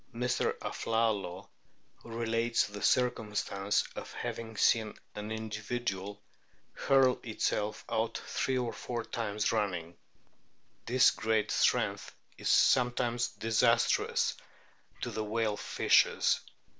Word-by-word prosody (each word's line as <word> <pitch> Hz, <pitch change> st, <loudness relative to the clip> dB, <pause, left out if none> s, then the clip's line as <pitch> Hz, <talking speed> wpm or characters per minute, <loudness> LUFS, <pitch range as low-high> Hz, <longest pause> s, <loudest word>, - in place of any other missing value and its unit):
Mr. 125 Hz, +1 st, 0 dB
Aflalo 105 Hz, -5 st, -1 dB, 0.6 s
relates 115 Hz, 0 st, 0 dB
the 105 Hz, 0 st, -8 dB
circumstance 105 Hz, -5 st, +1 dB
of -, -, -7 dB
having 110 Hz, -1 st, -5 dB
seen 110 Hz, -1 st, +2 dB, 0.2 s
O -, -, -5 dB
an 105 Hz, +1 st, -6 dB
individual 105 Hz, -2 st, -4 dB, 0.5 s
hurl 135 Hz, -2 st, +3 dB
itself 105 Hz, -2 st, -2 dB
out 110 Hz, +1 st, -1 dB
three 130 Hz, -1 st, -2 dB
or 120 Hz, -2 st, -2 dB
four 120 Hz, -2 st, -4 dB
times 105 Hz, -3 st, -1 dB
running. 90 Hz, -6 st, -2 dB, 0.9 s
This 130 Hz, +2 st, +5 dB
great 110 Hz, -1 st, 0 dB
strength -, -, +1 dB, 0.2 s
is -, -, -3 dB
sometimes 120 Hz, -1 st, +3 dB
disastrous 115 Hz, +1 st, +2 dB, 0.7 s
to -, -, -3 dB
the 110 Hz, -, -3 dB
whale 110 Hz, 0 st, 0 dB
fishers. -, -, +3 dB
110 Hz, 105 wpm, -31 LUFS, 105-120 Hz, 0.9 s, This